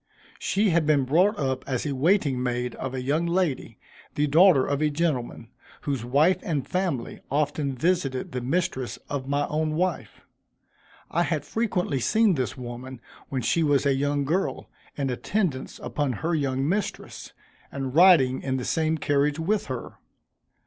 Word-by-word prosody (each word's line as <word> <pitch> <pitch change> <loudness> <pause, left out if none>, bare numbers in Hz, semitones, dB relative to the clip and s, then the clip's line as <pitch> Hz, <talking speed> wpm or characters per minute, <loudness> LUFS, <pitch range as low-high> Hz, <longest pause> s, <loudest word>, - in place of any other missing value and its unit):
She 205 0 +1
had 165 -2 +2
been 145 -3 +3
brought 180 - +3
up 130 -2 -1
as 130 +1 -1
a 145 - -1
waiting 145 -3 +2
maid 125 -1 -2
of 130 0 -5
a 130 - -3
young 155 +6 0
lady, 170 -5 -1 0.4
the 150 - +2
daughter 155 -1 +5
of 140 0 -1
a 155 - +3
gentleman, 145 -7 -2 0.3
whose 135 -5 -2
wife 145 +9 +3
and 155 -9 -2
family 180 -10 -2
often 145 -1 -1
visited 135 -3 0
the 125 - -3
mistress 135 -1 -2
of 135 -2 -4
my 145 +1 +1
own 155 0 -1
wife. 180 +3 -2 0.9
I - - +1
had - - -1
frequently 190 - -1
seen 220 - +3
this 130 -3 -2
woman 125 +1 -7 0.3
when 130 -3 -2
she 165 - +2
was 145 -2 +2
a 140 - +4
young 145 +1 0
girl, 180 +7 -2 0.2
in 135 -2 -1
attendance 150 - -2
upon 145 -4 -1
her 160 +10 -2
young 135 -3 0
mistress, 200 +5 -3 0.4
and 135 -2 -4
riding 155 -7 +6
in 130 -1 -1
the 125 - -4
same 160 0 0
carriage 145 0 +1
with 195 +6 -1
her. 130 -3 -6
145 Hz, 165 wpm, -25 LUFS, 130-170 Hz, 0.9 s, riding